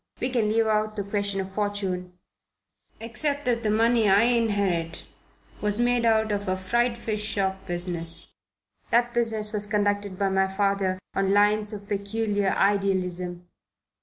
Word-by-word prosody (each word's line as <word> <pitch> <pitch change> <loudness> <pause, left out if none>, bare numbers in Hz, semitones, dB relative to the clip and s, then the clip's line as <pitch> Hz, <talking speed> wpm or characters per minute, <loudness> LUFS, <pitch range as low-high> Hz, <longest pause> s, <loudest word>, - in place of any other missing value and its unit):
We 250 - -1
can 230 -4 +1
leave 225 +1 +2
out 215 0 0
the 205 - -2
question 200 0 -1
of 190 0 -7
fortune 190 -3 -3 0.8
except 280 +6 -2
that 240 -2 +1
the 215 - 0
money 225 0 +3
I 200 +3 +5
inherit 200 -8 +1 0.6
was 210 +1 0
made 240 0 +2
out 220 -1 +3
of 205 0 -2
a 185 0 0
fried 235 +5 0
fish 215 -2 -3
shop 195 -2 -2
business. 175 -1 -2 0.6
That 240 +1 +2
business 225 -3 0
was 205 -1 0
conducted 205 -2 0
by 195 0 +1
my 190 0 +2
father 195 -1 0 0.2
on 195 0 +1
lines 210 +1 +3
of 205 -1 -8
peculiar 205 0 -1
idealism. 180 -3 0
205 Hz, 150 wpm, -25 LUFS, 190-225 Hz, 0.8 s, I